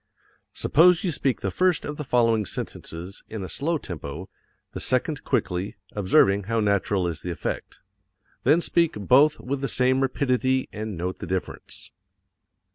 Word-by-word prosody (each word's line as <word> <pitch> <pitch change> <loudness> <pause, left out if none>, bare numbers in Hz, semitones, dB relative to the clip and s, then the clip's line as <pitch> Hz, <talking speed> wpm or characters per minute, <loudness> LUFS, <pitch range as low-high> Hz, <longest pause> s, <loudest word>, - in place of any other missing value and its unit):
Suppose 180 +5 +4
you 180 - +1
speak 135 -4 -1
the - - -1
first 185 -3 +2
of 145 0 -5
the 150 - -4
following 115 -4 +2
sentences 90 0 -6
in 110 -3 -5
a - - -5
slow 160 - -1
tempo, 85 - -7 0.4
the - - -6
second 145 +4 0
quickly, 100 -6 -1 0.2
observing 100 0 +3
how 115 +2 0
natural 100 -3 +1
is 85 -2 -4
the 90 - -5
effect. 85 - -4 0.7
Then 150 +7 +4
speak 170 -1 +2
both 130 +9 +4
with 135 +2 -3
the 135 - 0
same 130 +1 +2
rapidity 130 -1 +1
and 105 -3 -5
note 90 +2 -3
the - - -6
difference. 95 -1 -5
115 Hz, 155 wpm, -25 LUFS, 95-140 Hz, 0.7 s, Suppose